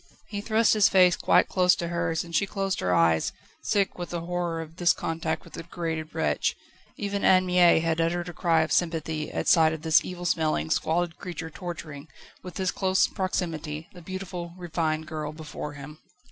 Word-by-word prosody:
He 205 Hz, -1 st, -4 dB
thrust 220 Hz, +1 st, +3 dB
his 210 Hz, -2 st, +5 dB
face 180 Hz, -2 st, +5 dB
quite -, -, +3 dB
close 180 Hz, -1 st, +3 dB
to 170 Hz, -, -4 dB
hers, 170 Hz, -1 st, -1 dB
and 170 Hz, -1 st, -7 dB
she 200 Hz, -, +2 dB
closed 195 Hz, -1 st, -2 dB
her 90 Hz, -, 0 dB
eyes, 85 Hz, -2 st, +3 dB, 0.3 s
sick 200 Hz, -3 st, 0 dB
with 175 Hz, -, -5 dB
the 170 Hz, -1 st, -3 dB
horror 175 Hz, -1 st, -2 dB
of 165 Hz, +1 st, -8 dB
this 175 Hz, -2 st, +4 dB
contact 160 Hz, -1 st, -3 dB
with -, -, -16 dB
the -, -, -6 dB
degraded 165 Hz, -2 st, -5 dB
wretch. 75 Hz, -2 st, 0 dB, 0.4 s
Even 200 Hz, -1 st, -3 dB
Anne 185 Hz, 0 st, +5 dB
Mie 180 Hz, -1 st, +5 dB
had 165 Hz, 0 st, 0 dB
uttered 170 Hz, +1 st, -1 dB
a 175 Hz, -, -6 dB
cry 165 Hz, -2 st, +2 dB
of 160 Hz, -, -2 dB
sympathy 160 Hz, -3 st, 0 dB
at -, -, -3 dB
sight 160 Hz, -2 st, +5 dB
of 160 Hz, -1 st, -7 dB
this 160 Hz, -1 st, +4 dB
evil 175 Hz, -1 st, -6 dB
smelling, 155 Hz, -, 0 dB
squalid 170 Hz, +1 st, 0 dB
creature 170 Hz, -3 st, -6 dB
torturing, 160 Hz, -4 st, -7 dB, 0.3 s
with 180 Hz, -, -9 dB
his 190 Hz, -2 st, 0 dB
close 190 Hz, -1 st, +2 dB
proximity, 165 Hz, -5 st, -3 dB
the 180 Hz, -, -12 dB
beautiful, 180 Hz, -1 st, -6 dB
refined 160 Hz, -3 st, -2 dB
girl 155 Hz, -2 st, -5 dB
before 150 Hz, -1 st, -7 dB
him. 145 Hz, +2 st, -10 dB
170 Hz, 190 wpm, -26 LUFS, 160-180 Hz, 0.4 s, his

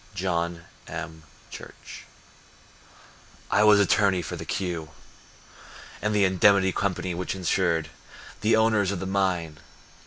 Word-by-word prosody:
John 85 Hz, -2 st, -2 dB, 0.2 s
M. 80 Hz, 0 st, -7 dB, 0.3 s
Church -, -, -11 dB, 1.5 s
I 105 Hz, -, +4 dB
was 105 Hz, -1 st, +6 dB
attorney 100 Hz, -2 st, +3 dB
for 90 Hz, -, -5 dB
the 80 Hz, -1 st, -7 dB
"Q" 85 Hz, -5 st, -3 dB, 1.1 s
And 105 Hz, 0 st, 0 dB
the 100 Hz, -1 st, +4 dB
Indemnity 95 Hz, +1 st, +4 dB
Company 95 Hz, -1 st, -2 dB
which 90 Hz, +2 st, -3 dB
insured 85 Hz, -3 st, 0 dB, 0.5 s
The 110 Hz, +2 st, +3 dB
owners 110 Hz, -3 st, +2 dB
of 100 Hz, -, -3 dB
the 95 Hz, -, -4 dB
mine. 90 Hz, -5 st, -1 dB
95 Hz, 120 wpm, -25 LUFS, 85-100 Hz, 1.5 s, was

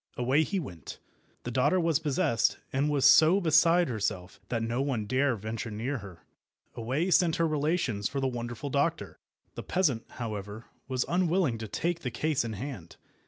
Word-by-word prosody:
Away 130 Hz, +5 st, +2 dB
he 195 Hz, +5 st, -1 dB
went. 85 Hz, -, -8 dB, 0.5 s
The 120 Hz, -, -4 dB
daughter 130 Hz, +9 st, +2 dB
was 165 Hz, -4 st, +2 dB
possessed, 135 Hz, -7 st, +1 dB, 0.2 s
and 140 Hz, +3 st, +1 dB
was 140 Hz, -2 st, +1 dB
so 160 Hz, +7 st, +7 dB
beside 170 Hz, 0 st, +4 dB
herself 100 Hz, -6 st, -3 dB
that 115 Hz, -2 st, -1 dB
no 115 Hz, +3 st, -1 dB
one 130 Hz, -6 st, -1 dB
dare 130 Hz, +3 st, +1 dB
venture 110 Hz, +2 st, -5 dB
near 120 Hz, +6 st, -3 dB
her. 95 Hz, -5 st, -12 dB, 0.5 s
Away 135 Hz, +11 st, -1 dB
sent 170 Hz, -2 st, +4 dB
her 165 Hz, -, +1 dB
relations 150 Hz, -, 0 dB
for 140 Hz, -, -3 dB
the 135 Hz, -, 0 dB
wonderful 120 Hz, +2 st, -5 dB
doctor. 150 Hz, +4 st, -1 dB, 0.3 s
The -, -, -6 dB
peasant, 150 Hz, -11 st, 0 dB
however, 105 Hz, -1 st, -6 dB, 0.2 s
was 130 Hz, -1 st, -1 dB
unwilling 175 Hz, -8 st, +1 dB
to 110 Hz, -, -5 dB
take 170 Hz, +10 st, -2 dB
the 135 Hz, -, -4 dB
case 145 Hz, +4 st, 0 dB
in 115 Hz, -2 st, -4 dB
hand. 105 Hz, -, -7 dB
130 Hz, 170 wpm, -29 LUFS, 115-160 Hz, 0.5 s, so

